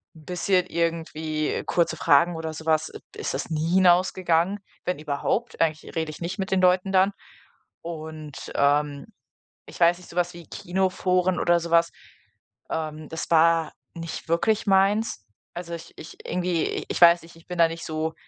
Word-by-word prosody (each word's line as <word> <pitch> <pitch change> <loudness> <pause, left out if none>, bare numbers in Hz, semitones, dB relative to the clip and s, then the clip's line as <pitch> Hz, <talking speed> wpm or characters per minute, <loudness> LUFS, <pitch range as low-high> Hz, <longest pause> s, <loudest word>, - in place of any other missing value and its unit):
'n 155 -2 -16
bisschen 180 +1 +1
irgendwie 160 -2 -2
kurze 170 -1 +1
Fragen 165 +3 +4
oder 160 -1 -4
so 160 0 -9
was, 160 0 +1 0.3
ist - - -3
das 135 - -4
nie 160 +1 -1
hinausgegangen, 180 0 +3 0.3
wenn 180 - -1
überhaupt. 150 +10 -2
Eigentlich 155 -1 -1
rede 160 -1 -1
ich 155 - -12
nicht 180 +4 -4
mit 190 - -2
den 190 -1 +2
Leuten 185 +1 +3
dann. 190 +1 +4 0.7
Und, 155 -3 -8
ähm, 145 0 +1 0.6
ich - - -12
weiß 170 0 +5
nicht, 180 - -15
so - - -12
was 175 0 +1
wie 170 -2 -12
Kinoforen 185 0 0
oder 175 0 +3
so 170 0 -6
was, 170 0 +4 0.8
ähm, 155 -1 -4
das 160 - -5
war 165 -1 +4 0.2
nicht 165 -1 -7
wirklich 215 +6 +1
meins. 195 - +2 0.3
Also, 170 -1 -6
ich 165 0 -11
ich 160 - -11
irgendwie 180 -2 -1
ich - - -3
weiß 170 0 +7
nicht, 165 0 -15
ich 165 - -19
bin 180 - -6
da 165 - +7
nicht 165 0 -7
so 160 0 -2
170 Hz, 170 wpm, -25 LUFS, 160-180 Hz, 0.8 s, weiß